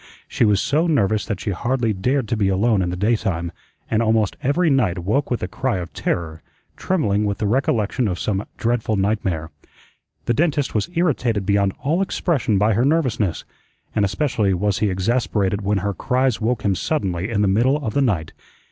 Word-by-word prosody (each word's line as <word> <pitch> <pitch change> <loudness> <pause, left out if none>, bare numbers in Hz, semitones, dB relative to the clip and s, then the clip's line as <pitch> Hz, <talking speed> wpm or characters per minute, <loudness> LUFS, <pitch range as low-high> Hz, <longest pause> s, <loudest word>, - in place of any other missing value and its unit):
She - - +1
was 105 -2 +3
so 150 +9 +1
nervous 110 - +1
that 105 -4 -3
she 100 - -3
hardly 120 +3 0
dared 125 +6 0
to - - +1
be 100 -3 +1
alone 100 +2 +2
in 90 - -1
the 90 - -3
daytime, 95 -4 0 0.4
and 110 0 +1
almost 110 -2 +1
every 155 +6 +1
night 110 -11 +2
woke 105 +11 0
with 120 - -2
a - - -1
cry 120 +3 -2
of 85 -2 -6
terror, 80 -2 -3 0.3
trembling 105 - 0
with 100 -2 -1
the 105 - -2
recollection 115 0 +1
of 90 -3 -2
some 95 +5 -2
dreadful 115 -2 0
nightmare. 95 -6 -1 0.7
The 120 - +1
dentist 150 0 0
was 105 -2 -1
irritated 125 - +1
beyond 100 -1 +2
all 160 +7 +1
expression 155 - 0
by 105 +3 +3
her 115 +5 +2
nervousness, 130 - 0 0.5
and 105 - +1
especially 105 -2 +1
was 100 +1 0
he 105 - +2
exasperated 100 0 0
when 100 +1 0
her 100 - 0
cries 130 +1 0
woke 115 +1 -1
him 100 - +3
suddenly 95 - -2
in 105 -3 +1
the - - +3
middle 120 +9 +3
of 110 - -2
the 140 - +2
night. 90 - 0
110 Hz, 190 wpm, -21 LUFS, 95-125 Hz, 0.7 s, was